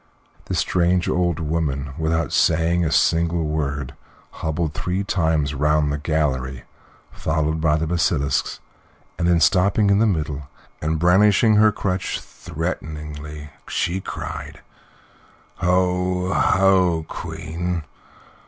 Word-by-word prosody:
This - - -2
strange 90 0 +1
old 85 -2 0
woman, 75 -4 -2
without 80 +1 -1
saying 85 +2 +2
a 80 - 0
single 85 0 +2
word, 75 -3 -2 0.4
hobbled 80 -1 -3
three 90 +4 -2
times 80 -7 0
round 75 +1 +1
the 75 - -3
gallery, 65 -5 -1 0.5
followed 80 0 -1
by 75 -2 +3
the 80 - -1
basilisks, 80 -3 0 0.6
then 85 0 +2
stopping 100 +5 +3
in 100 - +4
the 115 - +4
middle, 75 -6 -2 0.3
and 80 +1 0
brandishing 105 +5 +4
her 110 0 +6
crutch 95 -2 -2
threateningly, 75 -1 -6 0.2
she 90 +3 -1
cried: - - -7 1.0
"Ho, 90 0 +1
ho, 90 -4 +3
Queen! 85 +1 -4
80 Hz, 110 wpm, -22 LUFS, 75-90 Hz, 1.0 s, her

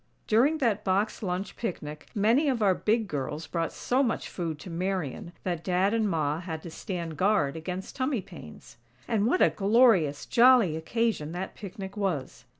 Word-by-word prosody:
During 260 +9 +3
that 225 -8 0
box 200 +3 0
lunch 185 -1 -3
picnic, 150 -9 -5
many 230 +9 +3
of 240 -5 0
our 195 -2 +5
"big 220 +3 0
girls" 150 0 -4
brought 165 -2 -2
so 255 +2 0
much 240 -4 -1
food 165 -4 -4
to 180 - -8
Marian 180 0 -3
that 175 -3 -2
Dad 185 +3 +1
and 220 -2 +1
Ma 155 -3 0
had 160 -3 -6
to 170 - -8
stand 170 -2 -5
guard 185 -7 +2
against 180 +4 -6
tummy 260 -3 0
pains. 75 - -13 0.3
And 220 -2 +1
what 365 +9 +3
a - - +4
glorious, 200 - +3
jolly 240 -8 +5
occasion 170 -2 -1
that 185 +2 -4
picnic 195 -1 -8
was! 185 -10 -3
190 Hz, 170 wpm, -28 LUFS, 165-225 Hz, 0.3 s, our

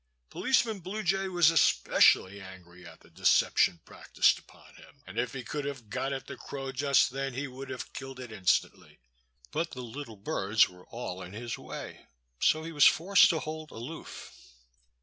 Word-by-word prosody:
Policeman 235 -5 +1
Blue 195 +5 -5
Jay 195 +2 +1
was 175 -3 +4
especially 100 - +4
angry 90 -2 -13
at - - -14
the - - -21
deception 85 - +3
practiced - - +1
upon - - -19
him, - - -18
and 95 +5 -5
if 120 -1 -1
he 130 -2 -5
could 145 +5 -4
have 130 -7 -7
got 135 +5 -2
at 135 -1 -4
the - - -8
crow 135 -1 -6
just 140 0 +3
then 135 -1 -4
he 140 +2 -3
would 130 +1 -9
have - - -7
killed 135 -1 -8
it 125 -3 -8
instantly. 95 -5 -1 0.5
But 170 - -1
the 125 - -6
little 120 0 -8
birds 100 +1 +2
were 90 0 -16
all 115 -6 -6
in 90 +1 -9
his 115 +2 -5
way, - - -9 0.3
so 155 0 +3
he 165 - -6
was 150 -3 +5
forced 190 +4 +5
to 160 - 0
hold 155 0 -6
aloof. 125 +9 -9
135 Hz, 180 wpm, -29 LUFS, 110-155 Hz, 0.5 s, was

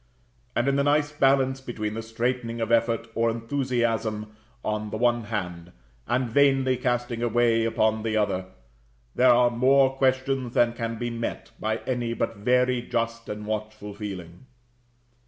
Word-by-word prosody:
And 120 - +1
in 140 0 +2
the 140 - +2
nice 145 +1 +2
balance 135 -2 +2
between 110 -5 -4
the 115 - -4
straitening 115 +1 -2
of 115 0 -2
effort 115 0 +2
or 115 0 +2
enthusiasm 115 -3 -1 0.3
on 105 0 -2
the 110 - -4
one 120 -1 +1
hand, 90 -5 -5 0.3
and 125 +2 +1
vainly 135 +1 +3
casting 120 -1 -1
it - - +1
away 115 -1 +2
upon 110 -1 +1
the 110 0 -1
other, 95 -3 0 0.7
there 130 0 +4
are 120 0 +5
more 135 +2 +4
questions 130 -1 0
than 120 -1 +4
can 115 -1 -3
be 120 +1 -3
met 115 0 -5
by 110 +1 -1
any 120 -2 -1
but 115 - -2
very 125 +3 +2
just 115 -1 -3
and 105 0 -5
watchful 110 -1 -5
feeling. 95 0 -8
115 Hz, 155 wpm, -26 LUFS, 110-125 Hz, 0.7 s, are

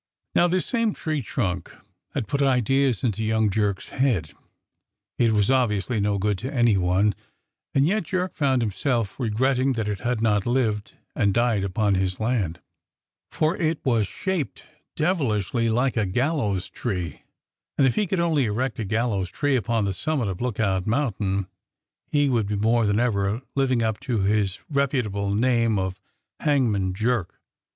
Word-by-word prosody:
Now 175 - +4
this 180 +1 0
same 230 -3 0
tree 155 -2 -2
trunk 95 -7 -2 0.4
had 105 - -2
put 140 +5 -1
ideas 135 -2 +2
into 110 -3 0
young 110 -1 +2
Jerk's 100 -1 -1
head. 110 - 0 0.9
It 115 -2 +4
was 105 +2 +2
obviously 120 -3 +1
no 100 0 +1
good 100 -1 0
to 130 +3 -4
any 120 -5 +3
one, 95 +3 +2 0.6
and 135 0 +4
yet 195 +3 +1
Jerk 185 +3 -2
found 135 -4 +1
himself 115 +1 -1
regretting 130 +3 +1
that 110 -3 -2
it 105 -2 -2
had 120 +1 -1
not 105 -2 +1
lived 115 -5 0 0.2
and 100 -2 +1
died 115 -4 +2
upon 100 +2 +1
his 95 -1 0
land, 110 -8 -1 0.7
for 155 +3 0
it 160 -1 0
was 115 -6 +2
shaped 190 - -3 0.3
devilishly 120 - 0
like 125 +4 +1
a 105 -3 +1
gallows 105 - 0
tree, 90 - -4 0.6
and 140 - +4
if 130 - +3
he 210 - 0
could 190 0 -1
only 160 -6 +2
erect 115 +4 -2
a 110 - -2
gallows 105 -3 0
tree 145 +8 0
upon 115 -2 0
the 100 - -1
summit 135 +4 -1
of 95 +1 -5
Lookout 100 -6 0
Mountain 105 -6 0 0.6
he 145 -1 +2
would 115 -6 +1
be 105 - -1
more 110 +2 +2
than 105 +1 +2
ever 110 -1 0
living 130 -4 +1
up 110 -1 -1
to 120 -6 -1
his 100 -1 +1
reputable 125 -9 0
name 115 -1 +2
of 95 0 -2 0.4
Hangman 110 -11 +1
Jerk. 110 -3 -1
115 Hz, 160 wpm, -24 LUFS, 100-135 Hz, 0.9 s, Now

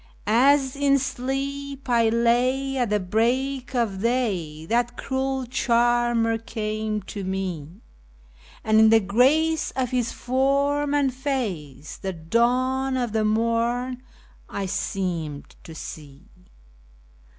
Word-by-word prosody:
As 265 +5 +3
in 280 0 +3
sleep 275 +1 -4
I 230 -2 +3
lay 250 +4 +1
at 245 -4 0
the 210 0 +2
break 245 +7 -1
of 215 -6 0
day 195 -11 -1
that 240 +5 0
cruel 265 -1 -2
charmer 240 -1 +2
came 215 -2 -3
to 200 +1 -6
me, 185 -1 -4 0.8
And 220 0 +4
in 220 0 +7
the 225 0 +6
grace 275 +10 +2
of 255 -2 -1
his 245 -2 0
form 280 +3 +1
and 275 -3 +2
face 210 - -4
the 190 -1 -4
dawn 250 +9 +1
of 245 -3 -1
the 220 0 +1
morn 230 +3 0 0.5
I 200 - -3
seemed 170 -6 -3
to 165 - -10
see. 150 +4 -10
235 Hz, 115 wpm, -24 LUFS, 210-265 Hz, 0.8 s, in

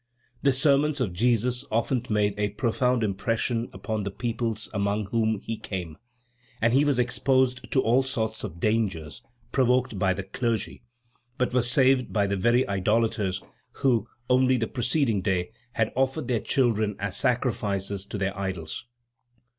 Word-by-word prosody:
The 140 - +4
sermons 140 +2 +3
of 110 -9 -1
Jesus 120 +4 +1
often 120 +2 0
made 105 -1 +2
a 105 0 0
profound 120 +3 0
impression 115 +4 -1
upon 110 -2 -3
the 100 - -3
peoples 115 0 -2
among 100 0 0
whom 110 +1 0
he 115 - -4
came, 90 -7 -5 0.6
and 115 +1 +2
he 135 +3 +5
was 145 -3 +2
exposed 130 +1 +1
to 130 - +3
all 120 +4 +4
sorts 110 -5 -2
of 85 -5 -6
dangers 95 -8 -1 0.3
provoked 125 -4 +2
by 95 0 +2
the 100 - -4
clergy, 115 +2 -2 0.6
but 125 -1 0
was 125 -1 +2
saved 130 -1 +3
by 105 -2 +2
the 100 0 0
very 120 +6 +2
idolators 100 -1 0 0.3
who, 120 -5 +1 0.2
only 130 0 +4
the 115 - 0
preceding 120 -3 0
day, 95 -1 -1 0.2
had 115 -2 0
offered 135 +4 0
their 120 -3 +1
children 110 -5 +1
as 100 -1 -3
sacrifices 100 -6 0
to - - -5
their 95 0 -1
idols. 95 +2 -4
115 Hz, 155 wpm, -26 LUFS, 100-125 Hz, 0.6 s, he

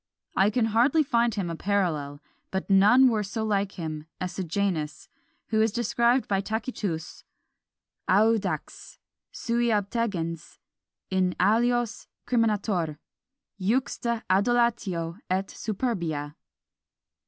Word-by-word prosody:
I 195 +2 +4
can 225 +1 +1
hardly 275 +8 +4
find 235 -4 +1
him 195 -4 -2
a - - -4
parallel; 160 -7 -1 0.3
but 190 +1 -3
none 210 +7 +7
were 225 -4 +2
so 210 +2 -3
like 200 -2 0
him 155 -3 -6
as 180 -1 -3
Sejanus, 175 -4 -2 0.4
who 220 -1 +2
is 220 0 +3
described 240 +2 +1
by 195 -1 +1
Tacitus, 210 -6 -4 0.9
Audax; 200 -5 +1 0.3
sui 235 0 -1
obtegens, 200 -6 -2 0.5
in 185 -1 +1
alios 235 +4 +1 0.2
criminator; 205 -9 0 0.6
juxta 235 +2 -1
adulatio 200 -4 +1
et 190 +1 0
superbia. 170 - -3
200 Hz, 105 wpm, -26 LUFS, 180-230 Hz, 0.9 s, none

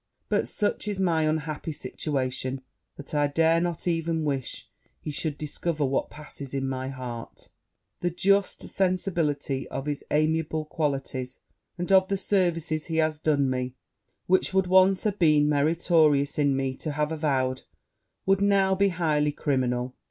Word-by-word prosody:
But, - - +1
such 210 0 -1
is 205 -2 -2
my 165 -4 +2
unhappy 155 0 -2
situation, 130 -2 -3 0.4
that 145 - -10
I 145 -1 +3
dare 165 +3 +3
not 175 0 -2
even 165 -1 0
wish 135 -3 -3 0.3
he 150 - -5
should 145 0 -3
discover 155 0 -2
what 135 0 0
passes 140 -2 -8
in 135 0 -1
my 130 0 -3
heart: 125 -3 -8 0.5
the 175 - 0
just 195 +3 +1
sensibility 165 -8 0
of 135 - -5
his 145 -1 -3
amiable 155 0 +1
qualities, 135 -5 -3 0.4
and 180 +2 -3
of 190 -1 +6
the 195 - 0
services 165 -5 0
he 160 - -2
has 155 -1 +1
done 145 -3 +2
me, 130 -1 -2 0.5
which 185 +1 +2
would 190 -1 +4
once 185 +1 +4
have 210 -2 -1
been 150 -3 +4
meritorious 150 -1 +3
in 140 -2 +3
me 135 -1 -1
to 155 - -4
have 150 +1 -1
avowed, 135 -5 0 0.6
would 195 0 +3
now 195 -1 +3
be 200 +1 +3
highly 155 -4 +1
criminal.' 125 -4 -1
155 Hz, 150 wpm, -26 LUFS, 140-175 Hz, 0.6 s, of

